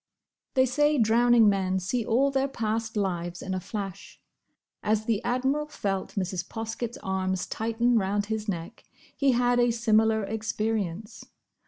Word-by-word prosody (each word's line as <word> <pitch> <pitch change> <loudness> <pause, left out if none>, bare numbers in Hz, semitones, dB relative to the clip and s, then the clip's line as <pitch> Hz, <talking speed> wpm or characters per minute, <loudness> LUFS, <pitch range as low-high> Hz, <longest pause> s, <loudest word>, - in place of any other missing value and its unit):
They 260 -1 +5
say 295 +4 +2
drowning 235 0 +5
men 190 -2 +2
see 205 +6 -1
all 260 +6 +2
their 270 0 +1
past 225 -3 -2
lives 175 -3 -2
in 190 - -3
a 185 - -1
flash. 195 -1 -7 0.6
As 215 0 0
the 220 -3 0
Admiral 265 +5 0
felt 195 -9 -3
Mrs. 185 -2 -2
Poskett's 225 +1 -5
arms 190 -1 -1
tighten 230 +1 +1
round 205 +1 0
his 215 0 -3
neck, 170 -3 -5 0.3
he 275 -2 +3
had 245 0 +2
a 240 0 +4
similar 220 -2 +2
experience. 215 -2 -3
220 Hz, 145 wpm, -27 LUFS, 195-240 Hz, 0.6 s, They